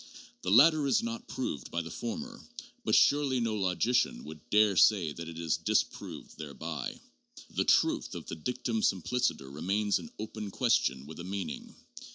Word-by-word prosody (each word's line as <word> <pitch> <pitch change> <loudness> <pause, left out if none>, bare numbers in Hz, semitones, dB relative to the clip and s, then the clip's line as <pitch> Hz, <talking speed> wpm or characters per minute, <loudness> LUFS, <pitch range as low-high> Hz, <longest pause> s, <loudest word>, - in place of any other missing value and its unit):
The - - -3
latter 145 - +6
is 135 - +2
not 235 +1 -5
proved 75 - -4
by 85 - -2
the 80 - -8
former, 235 +1 -5 0.4
but - - +2
surely 140 -3 +4
no 115 -2 0
logician 100 - +1
would 75 0 -11
dare 105 -1 +4
say 90 -4 +4
that 85 +2 -7
it 80 - -9
is 85 -2 0
disproved - - -2
thereby. 70 -3 -5 0.5
The - - 0
truth - - +2
of - - -7
the - - -5
dictum 115 +5 -2
simpliciter 100 - 0
remains 100 +7 0
an 235 - -9
open 110 -1 -6
question 65 -7 +1
with 80 +3 -10
a - - -5
meaning. 95 +1 -5
105 Hz, 165 wpm, -30 LUFS, 85-125 Hz, 0.5 s, latter